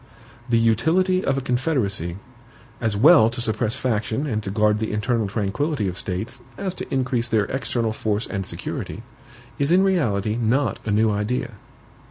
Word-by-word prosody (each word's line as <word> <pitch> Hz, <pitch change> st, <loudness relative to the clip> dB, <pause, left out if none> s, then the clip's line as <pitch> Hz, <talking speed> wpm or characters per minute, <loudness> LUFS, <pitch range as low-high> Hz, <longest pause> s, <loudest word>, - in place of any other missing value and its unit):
The 115 Hz, -, +4 dB
utility 160 Hz, -, +2 dB
of 135 Hz, -, +1 dB
a -, -, 0 dB
Confederacy, 105 Hz, -, 0 dB, 0.6 s
as 110 Hz, -3 st, 0 dB
well 140 Hz, -1 st, +7 dB
to 120 Hz, +2 st, -5 dB
suppress 110 Hz, -1 st, 0 dB
faction 115 Hz, +2 st, -1 dB
and 110 Hz, -7 st, -1 dB
to 105 Hz, -, -5 dB
guard 105 Hz, +1 st, +2 dB
the 110 Hz, -, -2 dB
internal 105 Hz, +1 st, 0 dB
tranquillity 105 Hz, +5 st, -1 dB
of 90 Hz, -, -3 dB
States, 105 Hz, +7 st, -5 dB, 0.2 s
as 195 Hz, -2 st, -3 dB
to -, -, -8 dB
increase 125 Hz, -3 st, 0 dB
their 110 Hz, -3 st, +2 dB
external 120 Hz, -3 st, -1 dB
force 110 Hz, 0 st, -1 dB
and 95 Hz, -2 st, -3 dB
security, -, -, -5 dB, 0.6 s
is 140 Hz, +2 st, +1 dB
in 185 Hz, +2 st, +5 dB
reality 110 Hz, -, +1 dB
not 120 Hz, +4 st, +1 dB
a -, -, 0 dB
new 110 Hz, +1 st, +3 dB
idea. 105 Hz, +5 st, -1 dB
115 Hz, 165 wpm, -23 LUFS, 105-135 Hz, 0.6 s, well